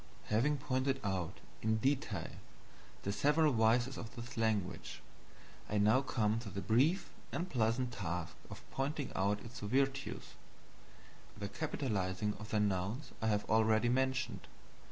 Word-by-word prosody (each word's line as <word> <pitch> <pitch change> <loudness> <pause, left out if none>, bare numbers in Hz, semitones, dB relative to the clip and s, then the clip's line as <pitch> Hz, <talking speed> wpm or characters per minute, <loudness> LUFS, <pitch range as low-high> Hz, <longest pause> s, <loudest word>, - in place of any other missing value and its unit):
Having 135 +8 +3
pointed 135 0 0
out, 95 -4 -2 0.2
in 110 0 +2
detail, 135 +5 0 0.7
the 100 - 0
several 150 +6 +3
vices 120 +3 +3
of 115 +1 -8
this 120 0 -7
language, 105 -4 -1 0.7
I 105 - 0
now 110 +5 +5
come 110 -5 +1
to 115 -3 -6
the 100 - -4
brief 135 - +2 0.2
and 175 - -2
pleasant 120 -2 +1
task 90 -5 -3
of - - -9
pointing 140 +1 -2
out 100 +2 +1
its 120 +2 -8
virtues. 135 +5 -1 1.0
The 100 -1 -4
capitalizing 105 -8 -1
of 110 0 -8
the 110 - +1
nouns 105 +7 0
I 110 - +1
have 105 -1 +1
already 110 +1 +4
mentioned. 130 +1 0
115 Hz, 135 wpm, -35 LUFS, 105-130 Hz, 1.0 s, now